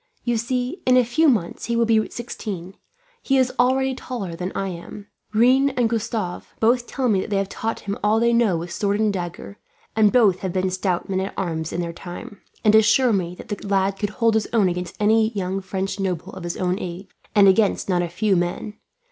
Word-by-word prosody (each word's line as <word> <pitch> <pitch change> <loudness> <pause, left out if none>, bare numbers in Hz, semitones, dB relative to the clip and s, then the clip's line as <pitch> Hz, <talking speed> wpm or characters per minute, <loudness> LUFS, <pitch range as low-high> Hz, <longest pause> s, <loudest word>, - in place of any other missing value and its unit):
You 240 -1 0
see, 250 - -2
in 255 0 +6
a 250 - +4
few 305 +7 +3
months 210 -10 -1
he 235 - -1
will 230 0 +3
be 220 -1 +2
sixteen. 195 -6 -6 0.5
He 270 - +1
is 255 -1 +2
already 265 +2 +3
taller 235 -9 -5
than 180 +2 -4
I 195 0 -2
am. 180 +3 -8 0.3
Rene 260 +5 +4
and 245 -2 +3
Gustave 220 -5 -3
both 240 +2 +2
tell 265 -2 -1
me 200 -5 +2
that - - -6
they 205 - 0
have 195 0 -1
taught 225 0 -3
him 200 0 -3
all 215 +2 +3
they 235 +1 +3
know 230 -7 +3
with 170 +1 -6
sword 200 +4 0
and 215 -2 +2
dagger; 180 +2 -6 0.4
and 215 -2 +4
both 215 -7 +4
have 185 -2 -4
been 185 0 0
stout 185 -1 -1
men 190 -1 -1
at 190 +1 -4
arms 160 -3 -2
in 175 - -2
their 170 -1 -4
time, 180 +3 -9 0.2
and 210 - +6
assure 220 +3 +5
me 180 -3 -1
that - - -12
the 205 -1 -5
lad 195 0 +1
could 205 - -1
hold 230 +1 +1
his 220 -1 +1
own 220 -5 +3
against 180 0 -4
any 220 +1 +3
young 195 -1 -2
French 190 +1 -3
noble 185 -1 -3
of 180 - -8
his 170 - -4
own 185 +1 0
age, 180 +2 -6 0.3
and 200 -1 +7
against 200 +1 +3
not 180 -2 +1
a 175 - -2
few 195 +3 +1
men. 175 +4 -2
205 Hz, 225 wpm, -22 LUFS, 185-230 Hz, 0.5 s, and